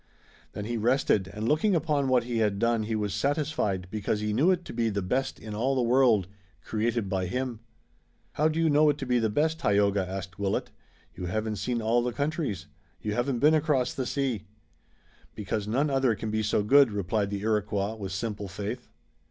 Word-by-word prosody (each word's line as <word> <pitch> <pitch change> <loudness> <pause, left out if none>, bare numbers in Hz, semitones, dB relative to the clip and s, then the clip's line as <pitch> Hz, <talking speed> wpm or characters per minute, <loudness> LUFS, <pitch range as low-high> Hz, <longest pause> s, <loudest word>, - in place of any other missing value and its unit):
Then 105 - -5
he 120 +1 -2
rested 115 -4 +2
and 105 +3 -4
looking 170 - +3
upon 150 -4 +1
what 130 -2 +3
he 120 -1 -2
had 105 -2 +1
done 115 +1 +2
he 110 +1 -2
was 105 -3 -1
satisfied 110 - -1
because 105 0 -1
he 105 0 -1
knew 145 - +3
it 180 -2 +1
to - - -8
be 115 -1 +1
the 100 -2 -2
best 130 +9 -1
in 110 -1 -7
all 125 +6 0
the 130 - +1
world, 120 -5 +4 0.4
created 115 0 -1
by 95 -1 -1
him." 125 +1 -3 0.7
"How 155 - +2
do 160 +1 -1
you 165 - +3
know 150 0 +5
it 145 - +1
to 135 - -5
be 125 -1 +2
the 110 -1 +1
best, 160 +8 +1
Tayoga?" 100 - +2
asked 95 0 -6
Willet. 100 -1 -1 0.4
"You 90 -1 -5
haven't 110 +3 -2
seen 115 +4 -2
all 115 +2 +3
the 120 0 -2
countries. 145 - -2 0.3
You 105 - -3
haven't 120 +3 0
been 150 +6 +5
across 145 -5 +1
the 130 -2 -3
sea." 125 -8 -2 0.9
"Because 105 0 -3
none 140 +7 +1
other 135 -4 +2
can 110 +1 -4
be 110 0 0
so 105 -1 +1
good," 135 +2 +6
replied 100 +1 -1
the 100 -1 -3
Iroquois 105 -1 0
with 100 -4 -6
simple 105 +1 -3
faith. 105 +6 -6
115 Hz, 200 wpm, -28 LUFS, 105-135 Hz, 0.9 s, good